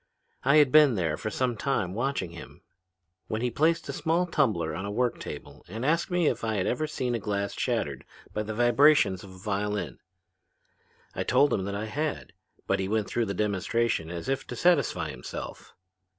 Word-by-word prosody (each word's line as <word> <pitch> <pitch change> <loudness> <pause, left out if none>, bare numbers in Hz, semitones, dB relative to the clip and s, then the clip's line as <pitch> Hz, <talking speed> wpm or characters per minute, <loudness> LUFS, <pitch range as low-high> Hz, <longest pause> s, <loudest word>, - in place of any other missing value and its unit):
I 140 +3 +4
had 145 -4 +6
been 150 -4 +7
there 80 -5 0
for 110 - -4
some 125 +2 -1
time 105 -7 -1
watching 120 -6 -2
him 85 - -11 0.7
when 110 +2 -2
he 125 - 0
placed 165 +6 +1
a - - -4
small 165 +3 +1
tumbler 130 - +1
on 95 - -4
a 100 - -4
work 120 +3 0
table 75 - -8
and 110 +7 -5
asked 165 +5 +1
me 180 -2 +1
if - - 0
I 110 -1 0
had 95 - 0
ever 155 +5 0
seen 125 -5 -2
glass 100 -1 -2
shattered 95 - -2 0.3
by 105 - -1
the 105 0 -4
vibrations 120 -5 +4
of 100 - -11
a 95 - -13
violin. 100 - -2 1.1
I - - -3
told 140 +4 +3
him 95 - 0
that 100 0 -3
I 105 +2 -3
had, 150 +7 -3 0.3
but 95 - +1
he 95 - -1
went 105 0 0
through 120 -2 0
the 100 - -3
demonstration 105 -3 0
as 85 +4 -6
if 135 0 -1
to 125 - -6
satisfy 175 +6 +2
himself. 60 - -8
110 Hz, 195 wpm, -28 LUFS, 100-140 Hz, 1.1 s, been